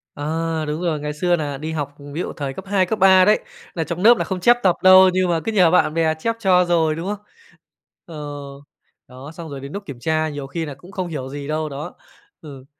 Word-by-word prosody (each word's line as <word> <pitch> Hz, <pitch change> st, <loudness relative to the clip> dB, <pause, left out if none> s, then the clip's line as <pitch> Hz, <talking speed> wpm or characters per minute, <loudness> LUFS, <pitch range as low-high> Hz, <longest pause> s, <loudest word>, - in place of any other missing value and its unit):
À! 160 Hz, +2 st, -2 dB
Đúng 150 Hz, +3 st, -3 dB
rồi, 165 Hz, -4 st, -1 dB
ngày 150 Hz, 0 st, -4 dB
xưa 175 Hz, +4 st, +1 dB
nà 145 Hz, -4 st, -4 dB
đi 155 Hz, +3 st, -5 dB
học, 145 Hz, -2 st, -4 dB, 0.2 s
ví 160 Hz, -, -4 dB
dụ, -, -, -5 dB
thời 140 Hz, -3 st, -5 dB
cấp 190 Hz, -, -9 dB
2, 195 Hz, -2 st, +2 dB
cấp 215 Hz, +4 st, -3 dB
3 190 Hz, -1 st, +6 dB
đấy, 210 Hz, +2 st, +4 dB, 0.4 s
nà 165 Hz, -, -1 dB
trong 170 Hz, +3 st, -5 dB
nớp 235 Hz, +2 st, +7 dB
nà -, -, -1 dB
không 190 Hz, -2 st, -4 dB
chép 240 Hz, +6 st, +5 dB
tập 185 Hz, -3 st, +4 dB
đâu, 185 Hz, 0 st, +8 dB
nhưng 185 Hz, -1 st, +1 dB
mà 170 Hz, -1 st, +1 dB
cứ 225 Hz, -, -1 dB
nhờ 180 Hz, -6 st, +4 dB
bạn 160 Hz, -3 st, +3 dB
bè 160 Hz, -1 st, +1 dB
chép 230 Hz, +6 st, -1 dB
cho 185 Hz, -4 st, +3 dB
rồi, 165 Hz, -3 st, +1 dB
đúng 165 Hz, +3 st, -5 dB
không? 210 Hz, 0 st, -5 dB, 0.8 s
Ờ, 165 Hz, -, -11 dB, 0.9 s
đó, 130 Hz, +4 st, -11 dB
xong 165 Hz, 0 st, -9 dB
rồi 140 Hz, -1 st, -7 dB
đến 140 Hz, +1 st, -9 dB
núc 200 Hz, 0 st, -6 dB
kiểm 140 Hz, -7 st, -9 dB
tra 155 Hz, +4 st, 0 dB
nhiều 145 Hz, -2 st, -6 dB
khi 165 Hz, +3 st, -4 dB
nà 145 Hz, -, -6 dB
cũng 175 Hz, +7 st, -15 dB
không 185 Hz, -2 st, -4 dB
hiểu 140 Hz, -6 st, -5 dB
gì 140 Hz, 0 st, -7 dB
đâu, 155 Hz, 0 st, -2 dB
đó. 140 Hz, +2 st, -7 dB, 0.5 s
Ừ. 140 Hz, -5 st, -11 dB
165 Hz, 250 wpm, -21 LUFS, 150-185 Hz, 0.9 s, đâu